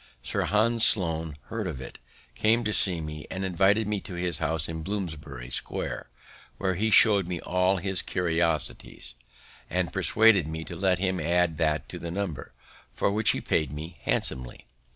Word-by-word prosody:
Sir -, -, -1 dB
Hans 115 Hz, +3 st, +3 dB
Sloane 80 Hz, -8 st, +2 dB
heard 110 Hz, -3 st, -3 dB
of 75 Hz, -7 st, -5 dB
it, 65 Hz, -, -9 dB, 0.3 s
came 110 Hz, -, +2 dB
to 105 Hz, -1 st, -1 dB
see 90 Hz, -6 st, +4 dB
me, 75 Hz, -1 st, -7 dB
and 95 Hz, +1 st, -3 dB
invited 100 Hz, +4 st, +2 dB
me 105 Hz, -1 st, 0 dB
to 95 Hz, -2 st, -8 dB
his 85 Hz, -3 st, -1 dB
house 80 Hz, -1 st, 0 dB
in 80 Hz, -1 st, -5 dB
Bloomsbury 80 Hz, -10 st, -5 dB
Square, -, -, -1 dB, 0.5 s
where 95 Hz, -1 st, 0 dB
he 105 Hz, +5 st, 0 dB
show'd 100 Hz, -4 st, +6 dB
me 90 Hz, -2 st, -3 dB
all 90 Hz, +1 st, +1 dB
his 95 Hz, 0 st, -1 dB
curiosities, 85 Hz, -7 st, -1 dB, 0.6 s
and -, -, -1 dB
persuaded 110 Hz, -7 st, +4 dB
me 80 Hz, +1 st, -5 dB
to 85 Hz, -, -7 dB
let 95 Hz, 0 st, +2 dB
him 95 Hz, 0 st, -1 dB
add 85 Hz, 0 st, +1 dB
that 80 Hz, -2 st, 0 dB
to -, -, -7 dB
the 85 Hz, -, -5 dB
number, 85 Hz, -5 st, -4 dB, 0.4 s
for -, -, 0 dB
which 105 Hz, +1 st, +2 dB
he -, -, +1 dB
paid 75 Hz, -4 st, 0 dB
me 80 Hz, +3 st, -8 dB
handsomely. 65 Hz, -1 st, -2 dB
90 Hz, 175 wpm, -27 LUFS, 80-100 Hz, 0.6 s, show'd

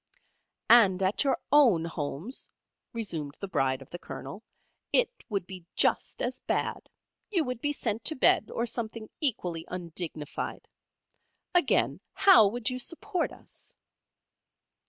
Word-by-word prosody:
"And 195 Hz, -6 st, +6 dB
at 190 Hz, +8 st, +2 dB
your 275 Hz, -, +2 dB
own 240 Hz, -, +5 dB
homes," 165 Hz, -, -5 dB, 0.4 s
resumed 165 Hz, -, -4 dB
the 195 Hz, -, -5 dB
Bride 135 Hz, -6 st, 0 dB
of -, -, -24 dB
the 175 Hz, -, -6 dB
Colonel, -, -, -8 dB, 0.5 s
"it -, -, +4 dB, 0.2 s
would 200 Hz, -4 st, -2 dB
be 185 Hz, -1 st, -8 dB
just -, -, +1 dB
as 250 Hz, +1 st, -2 dB
bad. -, -, -2 dB, 0.4 s
You 360 Hz, -6 st, +1 dB
would 250 Hz, -3 st, -4 dB
be 290 Hz, -, 0 dB
sent 225 Hz, -6 st, -2 dB
to 315 Hz, -, +4 dB
bed, 240 Hz, -4 st, +4 dB
or 235 Hz, -, -1 dB
something 225 Hz, -2 st, -5 dB
equally 180 Hz, -, 0 dB
undignified. 170 Hz, -4 st, -5 dB, 0.9 s
Again: 355 Hz, -1 st, +2 dB
how 230 Hz, -, +7 dB
would 225 Hz, +1 st, -3 dB
you 255 Hz, 0 st, 0 dB
support 350 Hz, +6 st, -2 dB
us?" -, -, -11 dB
220 Hz, 135 wpm, -28 LUFS, 175-255 Hz, 0.9 s, how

